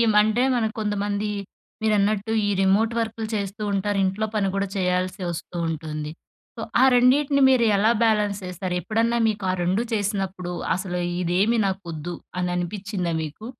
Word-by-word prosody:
Monday 215 +4 +4
మనం 225 -2 +1
కొంతమంది 205 0 -1 0.5
మీరన్నట్టు 210 0 +1
ఈ - - 0
రిమోట్ 205 +4 +3
వర్క్‌లు 225 0 -2
చేస్తూ 200 +1 -3
ఉంటారు. 200 +1 0
ఇంట్లో 195 +3 -1
పని 200 -2 +1
కూడా 195 0 0
చేయాల్సి 185 0 0
వస్తూ 170 +1 -7
ఉంటుంది. 155 -1 -4 0.5
సో, - - -5 0.2
ఆ - - +7
రెండింటిని 275 +3 +4
మీరెలా 225 -4 +4
బ్యాలెన్స్ 210 -3 +2
చేస్తారు? 180 0 -4
ఎప్పుడన్నా 225 +5 +1
మీకు 210 -2 -2
ఆ - - -1
రెండూ 185 +5 +1
చేసినప్పుడు 195 -4 -2 0.2
అసలు 180 -1 -3 0.2
ఇదేమీ 190 +7 +2
నాకొద్దు 175 -4 -4 0.3
అని 180 0 0
అనిపిచ్చిందా 185 0 -3
మీకు? 155 +8 -8
200 Hz, 140 wpm, -24 LUFS, 180-220 Hz, 0.5 s, ఆ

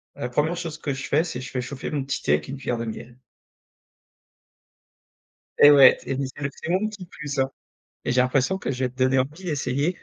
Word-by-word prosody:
la 120 - -4
1re 155 +7 0
chose 165 -3 -5
que 140 - -2
je 135 0 -5
fais, 155 +3 +3
c'est 155 -8 -5
je 130 - -7
fais 125 - -2
chauffer 135 +4 -6
mon 145 -3 -1
petit 135 - -3
thé 75 - +3
avec 75 - 0
une 140 - -5
cuillère 120 -3 -2
de 115 - -3
miel. 120 +2 -8 2.4
Et 145 - +9
ouais 135 -3 +8
et 135 - -2
c'est 140 - -1
c'est 145 +2 -11
le 140 - 0
petit 160 - -9
mon 195 +4 +1
petit 205 -4 -8
plus, 150 -4 -6
hein, 135 0 +1 0.5
et - - 0
j'ai 125 - +3
l'impression 135 +8 +1
que - - -3
je 130 0 -2
vais 125 - -1
te 130 - -25
donner 130 0 +3
envie 150 +8 -2
d'essayer. 145 +1 -1
135 Hz, 235 wpm, -24 LUFS, 130-155 Hz, 2.4 s, Et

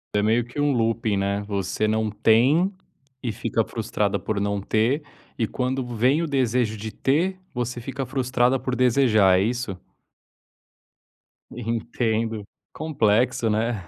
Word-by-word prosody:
É 105 - +3
meio 115 +3 +2
que 125 +4 -5
um 145 0 +3
looping, 115 -3 +1
né. 100 +1 0
Você 100 +1 -1
não 110 0 0
tem 125 - +3 0.5
e 120 - -1
fica - - -1
frustrada - - -1
por 105 -2 -2
não 100 0 -1
ter 115 +9 +1 0.4
e, 115 - +1
quando 130 +2 -2
vem 125 +6 +1
o 165 - -1
desejo 125 -5 +1
de 110 +1 -6
ter, 175 +11 0
você 125 -2 -3
fica 135 +2 -4
frustrada 125 0 +1
por 130 0 -2
desejar, 115 -7 +4
é - - +2
isso? 120 -2 -2 1.8
Entendo. 115 -1 -2 0.3
Complexo, 120 -6 +1
né? 110 -2 0
115 Hz, 140 wpm, -24 LUFS, 110-130 Hz, 1.8 s, desejar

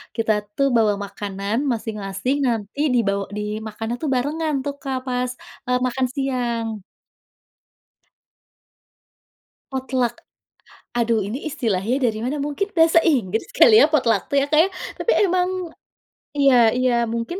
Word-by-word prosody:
kita 225 -1 +1 0.2
tuh 275 - +3
bawa 220 -3 +4
makanan 200 +1 -4
masing-masing 215 +2 -2
nanti 225 +1 -3 0.2
dibawa 200 -4 +1
dimakannya 215 +2 -4
tuh 310 - -1
barengan 305 +5 -1
tuh 285 - -2
Kak, 270 -1 -2
pas 250 0 -1 0.6
makan 255 +1 0
siang. 235 -6 -2 2.9
Potluck, 255 -2 -1 0.8
aduh 235 -1 +2
ini 235 +10 -5
istilahnya 225 -4 -1
dari 215 -1 -5
mana, 265 +5 -2
mungkin 295 +8 -2
bahasa 330 0 +5
Inggris 225 - +1
kali 445 -3 +7
ya - - +8
potluck 235 -9 +2
tuh 280 - +2
ya - - +1
Kak 305 - +5
ya. 385 - 0 0.3
Tapi 475 - +1
emang 365 -1 +2 0.9
iya 275 -2 +5 0.2
iya, 255 -1 +2 0.2
mungkin 235 +11 -3
245 Hz, 125 wpm, -22 LUFS, 220-280 Hz, 2.9 s, ya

